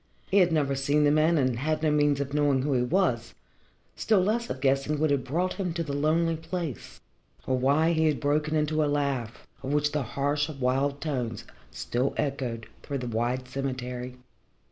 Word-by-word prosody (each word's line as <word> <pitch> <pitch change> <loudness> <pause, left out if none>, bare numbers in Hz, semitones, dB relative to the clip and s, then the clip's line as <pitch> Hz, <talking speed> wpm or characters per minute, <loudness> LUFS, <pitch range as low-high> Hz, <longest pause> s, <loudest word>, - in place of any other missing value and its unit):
He 200 - +5
had 180 -2 +4
never 145 -4 +1
seen 145 +2 +1
the 145 - +4
man 155 +2 +3
and 130 -4 +1
had 155 +3 -1
no 155 - +3
means 145 -1 +2
of 140 0 -3
knowing 145 -3 +2
who 145 0 0
he 125 - +2
was, 125 - 0 0.6
still 215 -3 +2
less 220 +5 0
of - - -4
guessing 135 +2 +1
what 155 0 +1
had 140 -2 +1
brought 175 +8 -1
him 185 -4 -3
to 165 0 -2
the 145 -3 -5
lonely 160 +3 +1
place, 165 -3 -6 0.5
or 130 - +1
why 140 +6 +3
he 160 -1 +2
had 150 -2 +1
broken 150 +2 0
into 155 0 +1
a - - +1
laugh, 140 -6 -2 0.2
of 135 - -4
which 150 0 +2
the 150 - -1 0.2
harsh, 145 +2 +1
wild 140 0 -1
tones 125 -7 -3 0.3
still 125 +3 -2
echoed 130 -6 -2 0.2
through 140 - -4
the 125 - -5
wide 120 +3 -1
cemetery. 125 -1 -4
145 Hz, 190 wpm, -27 LUFS, 130-155 Hz, 0.6 s, He